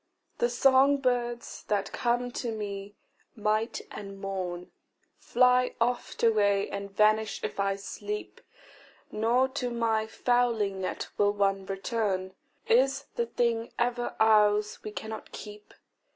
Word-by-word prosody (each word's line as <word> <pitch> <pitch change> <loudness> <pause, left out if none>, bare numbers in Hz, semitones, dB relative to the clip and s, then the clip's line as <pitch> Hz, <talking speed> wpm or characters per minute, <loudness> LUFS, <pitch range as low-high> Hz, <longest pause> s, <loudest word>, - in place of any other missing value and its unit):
THE 240 - +2
song 270 +3 +5
birds 245 -3 -2
that 200 -2 0
come 245 +1 0
to 240 -1 -3
me 205 -2 -5 0.4
night 215 +1 0
and 195 -1 -8
morn, 185 -2 -4 0.5
Fly 250 +1 +3
oft 240 +1 -1
away 205 -3 +3
and 200 0 -5
vanish 215 +2 +2
if - - -4
I 195 0 +1
sleep, 410 - -6 0.7
Nor 235 +4 +2
to 260 -2 -3
my 225 -2 0
fowling 225 -5 +1
net 185 - -3
will 205 0 +4
one 195 -1 0
return: 195 -2 -2 0.3
Is 270 +4 +3
the 235 - -1
thing 230 -1 -1
ever 240 0 -1
ours 210 -1 +4
we - - -6
cannot 220 +1 -7
keep? 210 -1 -10
220 Hz, 125 wpm, -28 LUFS, 200-240 Hz, 0.7 s, song